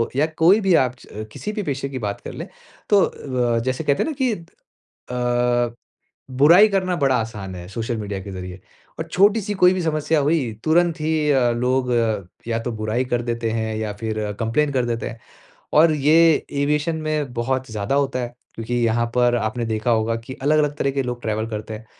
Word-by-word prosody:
या 145 +3 +3
कोई 175 +6 +5
भी 190 -2 +3
आप 125 0 -5
च - - -16
अ, 110 +1 -5
किसी 210 - -5
भी 210 -1 -3
पेशे 140 -3 -3
की 130 -2 -5
बात 100 -2 -4
कर - - -8
लें, - - -7 0.4
तो 205 -1 +5 0.6
व - - +2
जैसे 130 +3 -1
कहते 140 -2 +2
हैं - - -2
न - - -3
कि 255 -3 +3
अ, 120 - -3 0.6
बुराई 170 +9 +7
करना 185 -2 0
बड़ा 135 -2 +2
आसान 100 -4 -6
है 90 0 -8
सोशल 115 +3 -3
मीडिया 100 -2 -4
के 100 - -8
ज़रिए 90 0 -7 0.4
और 160 - -4
छोटी-सी 205 +4 +2
कोई 180 0 +5
भी 185 - -2
समस्या 155 0 +1
हुई, 145 -5 +1
तुरंत 170 +1 +3
ही 155 -1 +1
अ, 125 -3 +3
लोग 125 +2 0
अ, 110 -5 +1 0.2
या 115 -1 0
तो 120 - -3
बुराई 115 +4 0
कर 120 -1 -1
देते 115 -1 -2
हैं, 110 -1 -2
या 110 -1 -3
फिर 110 -2 -2
कंप्लेन 120 +6 +1
कर 125 -2 +1
देते 120 0 -2
हैं। 115 -1 -10 0.6
और 165 -1 +5
ये 150 +1 +3 0.4
एविएशन 150 +3 0
में 155 -4 -2
बहुत 130 +1 -2
ज़्यादा 105 +3 -2
होता 140 -2 +1
है। 120 -1 -5 0.2
क्योंकि 115 +2 -4
यहाँ 115 +1 +2
पर 120 -1 +3
आपने 115 +1 -2
देखा 110 +1 -1
होगा 115 0 +1
कि 130 - -7
अलग-अलग 150 0 +2
तरह 140 - 0
के 135 - 0
लोग 125 -1 -4
ट्रैवल 110 0 -1
करते 110 0 -5
हैं। 110 +1 -10
125 Hz, 205 wpm, -22 LUFS, 115-155 Hz, 0.6 s, बुराई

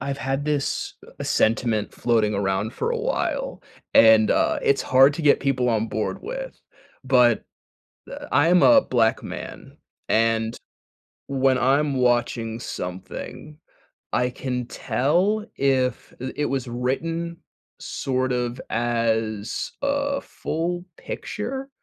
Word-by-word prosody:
I've 140 +1 -3
had 135 +1 -2
this, 150 -2 -1 0.3
uh, - - -4
sentiment 110 -1 +1
floating 110 -3 +1
around 100 +2 -1
for - - -2
a 475 - 0
while, - - -2 0.3
and, 110 -1 +7
uh, - - +2
it's 140 - +2
hard 135 +2 +5
to 165 - -5
get 145 -1 +4
people 130 -3 +1
on 115 0 0
board 110 0 -2
with. - - -6 0.5
But, 125 -3 +4 0.7
uh, - - -7
I 145 +4 +4
am 175 +1 +5
a 280 -2 +7
black 115 -3 +1
man, - - -8 0.3
and, 115 +1 +1 0.7
when 135 -1 +2
I'm 140 +3 +2
watching 120 -2 0
something, 95 +10 -7 0.5
I 125 0 +1
can 125 -1 -3
tell 185 - 0
if, 130 -3 0
uh, 130 +1 -4
it 150 - -1
was 135 -3 -2
written 165 +8 -2 0.4
sort 130 -1 -2
of 125 0 -2
as 115 -2 -1
a 280 0 0
full 175 +2 -3
picture 265 +6 -5
130 Hz, 125 wpm, -24 LUFS, 115-150 Hz, 0.7 s, and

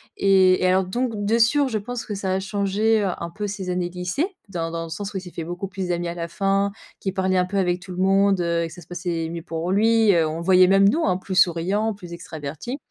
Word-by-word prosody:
Et 190 -2 +4
et - - +4
alors 185 +1 +3
donc 240 +6 -1
de 225 +3 +2
sûr 270 +5 +3
je 225 -4 -1
pense 235 +3 -5
que 210 - -4
ça 190 -1 -1
a - - 0
changé, 205 +3 +1
heu, - - +1
un 170 - -4
peu 210 -1 -3
ses 195 -2 -5
années 180 -1 -1
de 175 - -17
lycée, 180 - -1 0.2
dans 165 -3 -4
dans 165 0 -3
le - - -9
sens 200 +5 -5
où - - -2
il - - -4
s'est 180 -1 -10
fait 165 - -5
beaucoup 175 +4 -5
plus 190 -1 -5
d'amis 175 0 -1
à 170 - -3
la 170 -1 -4
fin, 195 +2 +1 0.3
qu'il 190 - -2
parlait 190 -1 0
un 180 - +4
peu 195 +2 -3
avec 180 -2 +1
tout 185 - -10
le 180 - -7
monde, 195 +1 +3
heu, 170 -1 0
et - - -2
que 165 - -11
ça 175 - -11
se 165 - -17
passait 175 -2 -3
mieux 170 0 -5
pour 165 0 -3
lui 225 0 +4
heu, 165 -2 +3
on 155 +1 -4
le 170 - -5
voyait 185 0 +6
même 195 +1 +5
nous, 320 +11 +2
hein, 185 -1 +2
plus 185 0 -6
souriant, 190 +6 +2
plus 180 -4 -10
extraverti. 160 - -6
185 Hz, 285 wpm, -23 LUFS, 175-200 Hz, 0.3 s, voyait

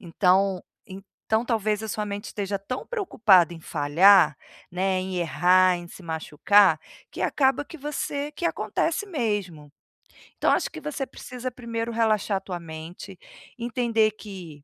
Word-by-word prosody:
Então 185 +1 +2 0.7
então 220 +2 +3
talvez 215 -3 0
a 220 - -4
sua 210 +1 -2
mente 200 0 -5
esteja 200 -1 -3
tão 225 +7 -5
preocupada 215 - +3
em 165 - -11
falhar, 165 +7 +4 0.3
né, 185 +1 0
em 185 0 -4
errar, 180 +2 +4
em 175 0 -8
se 185 - -12
machucar, 165 +5 +3 0.3
que - - -5
acaba 270 0 +2
que 325 - -11
você 290 0 -4
que 320 - -7
acontece 340 +4 -1
mesmo. 205 - -3 0.7
Então - - +2
acho - - +1
que - - -9
você 295 -2 -4
precisa 255 -1 -7
primeiro 230 -1 -4
relaxar 215 -3 +1
tua 180 -2 -6
mente, 165 +4 -9 0.4
entender 230 -2 +1
que 185 -9 -11
200 Hz, 145 wpm, -25 LUFS, 180-235 Hz, 0.7 s, falhar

